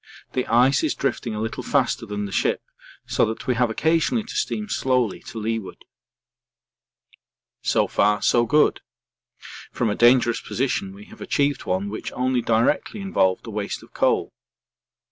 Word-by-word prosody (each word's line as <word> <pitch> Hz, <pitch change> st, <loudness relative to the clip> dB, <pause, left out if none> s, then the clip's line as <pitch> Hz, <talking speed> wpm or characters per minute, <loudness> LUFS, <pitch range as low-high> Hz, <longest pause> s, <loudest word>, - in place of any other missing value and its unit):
The 125 Hz, -, -1 dB
ice 125 Hz, -, +4 dB
is 315 Hz, -, 0 dB
drifting 120 Hz, -4 st, -2 dB
a -, -, -4 dB
little 110 Hz, +3 st, -3 dB
faster 125 Hz, -3 st, 0 dB
than 105 Hz, 0 st, -3 dB
the 100 Hz, -, -7 dB
ship -, -, 0 dB, 0.4 s
so -, -, +1 dB
that 110 Hz, +3 st, -5 dB
we 130 Hz, -, +2 dB
have 120 Hz, 0 st, +1 dB
occasionally 165 Hz, -, +1 dB
to 220 Hz, -, -9 dB
steam 215 Hz, 0 st, -2 dB
slowly 125 Hz, -, 0 dB
to -, -, -8 dB
leeward. 110 Hz, -2 st, -4 dB, 1.8 s
So -, -, +2 dB
far 105 Hz, 0 st, +1 dB
so 120 Hz, -1 st, +3 dB
good. 150 Hz, 0 st, +3 dB, 0.9 s
From 115 Hz, -4 st, 0 dB
a -, -, -1 dB
dangerous 120 Hz, -1 st, +4 dB
position 120 Hz, -7 st, -2 dB
we 105 Hz, +1 st, -12 dB
have -, -, -15 dB
achieved 140 Hz, -1 st, 0 dB
one 95 Hz, +2 st, 0 dB
which 105 Hz, +2 st, -5 dB
only 130 Hz, 0 st, 0 dB
directly 115 Hz, -, +1 dB
involved 145 Hz, -, +1 dB
a 115 Hz, -, -7 dB
waste 105 Hz, -1 st, -4 dB
of -, -, -18 dB
coal. -, -, +1 dB
120 Hz, 160 wpm, -23 LUFS, 105-130 Hz, 1.8 s, ice